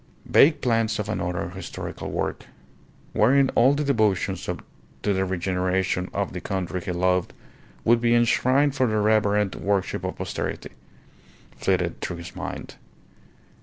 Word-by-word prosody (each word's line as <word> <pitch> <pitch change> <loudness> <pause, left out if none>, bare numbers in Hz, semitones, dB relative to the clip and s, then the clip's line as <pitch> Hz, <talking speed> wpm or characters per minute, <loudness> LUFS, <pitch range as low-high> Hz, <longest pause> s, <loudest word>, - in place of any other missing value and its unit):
Vague 150 +3 +5
plans 115 -2 +1
of 105 - -3
another 90 -4 -2
historical - - -6
work, - - -3 0.7
wherein 135 +5 +4
all 130 +4 +5
the 150 - -1
devotions 105 -8 +1 0.6
to 105 - +2
the 95 0 +1
regeneration 90 0 -1
of 100 -2 -2
the 90 - -5
country 95 -2 -3
he 90 - -4
loved 90 0 +1 0.5
would 115 0 +4
be 120 0 +3
enshrined 130 +4 +3
for 130 -2 +2
the 110 -1 0
reverent 105 -1 +2
worship 100 -1 -1
of - - -3
posterity, - - -4 0.8
flitted - - -1
through 85 - -4
his 85 - -9
mind. - - -6
105 Hz, 135 wpm, -24 LUFS, 95-120 Hz, 0.8 s, Vague